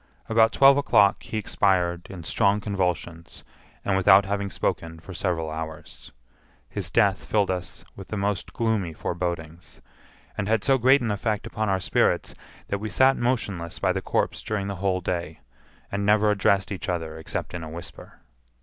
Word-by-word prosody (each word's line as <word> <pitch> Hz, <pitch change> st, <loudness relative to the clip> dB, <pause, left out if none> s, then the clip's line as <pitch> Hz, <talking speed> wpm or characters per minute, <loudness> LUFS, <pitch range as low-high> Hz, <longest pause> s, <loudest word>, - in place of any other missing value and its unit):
About 110 Hz, 0 st, +4 dB
twelve 135 Hz, +2 st, +6 dB
o'clock 105 Hz, -8 st, +4 dB
he 110 Hz, -, -5 dB
expired 90 Hz, -5 st, +1 dB
in 95 Hz, -3 st, -8 dB
strong 100 Hz, +5 st, +2 dB
convulsions, 90 Hz, -5 st, -3 dB, 0.4 s
and 100 Hz, -, +1 dB
without 95 Hz, +1 st, +6 dB
having 100 Hz, 0 st, -2 dB
spoken 80 Hz, -2 st, -3 dB
for 95 Hz, +3 st, -10 dB
several 85 Hz, -4 st, -1 dB
hours. 80 Hz, -1 st, -8 dB, 0.6 s
His -, -, -4 dB
death 100 Hz, -1 st, +2 dB
filled 100 Hz, -3 st, +1 dB
us 90 Hz, -1 st, -5 dB
with 95 Hz, -, -10 dB
the 110 Hz, -, -4 dB
most 100 Hz, -2 st, -2 dB
gloomy 110 Hz, -7 st, -1 dB
forebodings, 85 Hz, 0 st, -5 dB, 0.6 s
and 100 Hz, -, -3 dB
had 110 Hz, -2 st, +1 dB
so 135 Hz, -1 st, +3 dB
great 130 Hz, +3 st, +5 dB
an 115 Hz, -3 st, -1 dB
effect 105 Hz, 0 st, -2 dB
upon 110 Hz, -1 st, -2 dB
our 95 Hz, -1 st, +1 dB
spirits -, -, +1 dB, 0.4 s
that 100 Hz, -, -1 dB
we 110 Hz, +1 st, -4 dB
sat 130 Hz, +6 st, +4 dB
motionless 105 Hz, -9 st, -2 dB
by -, -, +1 dB
the -, -, -2 dB
corpse -, -, -1 dB
during 105 Hz, -2 st, -3 dB
the 100 Hz, -1 st, -4 dB
whole 95 Hz, 0 st, 0 dB
day, 85 Hz, -3 st, -4 dB, 0.5 s
and 100 Hz, +1 st, -2 dB
never 105 Hz, +1 st, +4 dB
addressed 100 Hz, -1 st, +2 dB
each 95 Hz, -, -4 dB
other 80 Hz, -3 st, -3 dB
except 80 Hz, -, -5 dB
in 85 Hz, -2 st, -5 dB
a 80 Hz, -, -7 dB
whisper. 85 Hz, +2 st, -10 dB
95 Hz, 170 wpm, -25 LUFS, 85-105 Hz, 0.6 s, twelve